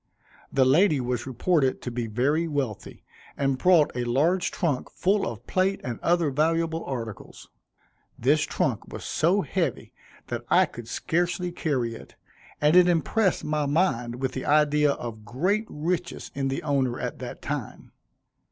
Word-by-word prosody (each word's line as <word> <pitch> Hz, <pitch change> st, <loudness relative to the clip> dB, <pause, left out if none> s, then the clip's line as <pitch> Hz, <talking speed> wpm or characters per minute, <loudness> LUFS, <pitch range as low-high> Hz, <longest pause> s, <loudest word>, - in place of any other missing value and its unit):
The 135 Hz, -1 st, +3 dB
lady 155 Hz, +3 st, +4 dB
was 125 Hz, 0 st, -2 dB
reported 135 Hz, +2 st, +1 dB
to 125 Hz, -, -4 dB
be 120 Hz, -1 st, -3 dB
very 140 Hz, +9 st, +1 dB
wealthy, 135 Hz, -9 st, -4 dB, 0.3 s
and 135 Hz, -2 st, 0 dB
brought 170 Hz, -6 st, +4 dB
a 125 Hz, -, -1 dB
large 155 Hz, +10 st, +1 dB
trunk 150 Hz, -7 st, -2 dB
full 200 Hz, +2 st, +1 dB
of 115 Hz, 0 st, -7 dB
plate 190 Hz, +1 st, +1 dB
and 120 Hz, -2 st, -4 dB
other 170 Hz, -3 st, +2 dB
valuable 165 Hz, +3 st, 0 dB
articles. 115 Hz, -6 st, -7 dB, 0.7 s
This -, -, +3 dB
trunk -, -, -1 dB
was -, -, -7 dB
so -, -, +2 dB
heavy -, -, -2 dB, 0.3 s
that -, -, -4 dB
I -, -, +5 dB
could 120 Hz, -2 st, -10 dB
scarcely 175 Hz, +6 st, -1 dB
carry 130 Hz, -9 st, -1 dB
it, 115 Hz, -, -12 dB, 0.4 s
and 150 Hz, +3 st, +3 dB
it 180 Hz, -1 st, +7 dB
impressed 180 Hz, +3 st, +1 dB
my 150 Hz, -1 st, -1 dB
mind 140 Hz, -7 st, +1 dB
with 130 Hz, -1 st, -1 dB
the 130 Hz, -, -5 dB
idea 150 Hz, -1 st, +3 dB
of 110 Hz, -4 st, -7 dB
great 185 Hz, -, 0 dB
riches 175 Hz, +3 st, -3 dB
in 135 Hz, -1 st, -1 dB
the 135 Hz, -, -3 dB
owner, 135 Hz, -5 st, 0 dB
at -, -, -4 dB
that -, -, -8 dB
time. -, -, -5 dB
145 Hz, 155 wpm, -26 LUFS, 125-170 Hz, 0.7 s, it